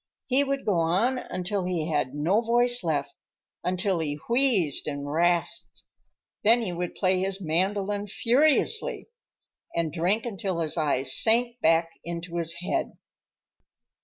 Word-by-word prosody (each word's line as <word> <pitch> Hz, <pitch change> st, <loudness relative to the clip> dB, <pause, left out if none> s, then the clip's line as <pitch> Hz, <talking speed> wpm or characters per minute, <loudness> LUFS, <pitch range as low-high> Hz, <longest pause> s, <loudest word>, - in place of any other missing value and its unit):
He 270 Hz, +2 st, +2 dB
would 275 Hz, 0 st, -3 dB
go 195 Hz, -5 st, +1 dB
on 195 Hz, +11 st, +1 dB
until 185 Hz, -1 st, -3 dB
he 175 Hz, -4 st, -2 dB
had 140 Hz, -3 st, -1 dB
no 175 Hz, +9 st, +1 dB
voice 240 Hz, 0 st, +2 dB
left, 155 Hz, -4 st, -1 dB, 0.5 s
until 185 Hz, 0 st, 0 dB
he 145 Hz, -2 st, -2 dB
wheezed 235 Hz, -, +3 dB
and 145 Hz, -1 st, -4 dB
rasped. 170 Hz, +3 st, -1 dB, 0.6 s
Then 230 Hz, +3 st, +5 dB
he 185 Hz, -5 st, -3 dB
would 175 Hz, 0 st, -4 dB
play 185 Hz, -1 st, +1 dB
his 190 Hz, +1 st, -1 dB
mandolin 195 Hz, +4 st, -1 dB
furiously, 305 Hz, -, +1 dB, 0.7 s
and 165 Hz, -2 st, -1 dB
drink 180 Hz, +7 st, +1 dB
until 195 Hz, -6 st, -3 dB
his 155 Hz, -2 st, -1 dB
eyes 140 Hz, -5 st, +1 dB
sank 235 Hz, +2 st, +2 dB
back 165 Hz, +1 st, +3 dB
into 170 Hz, 0 st, -5 dB
his 165 Hz, -1 st, 0 dB
head. -, -, -2 dB
185 Hz, 135 wpm, -26 LUFS, 165-230 Hz, 0.7 s, Then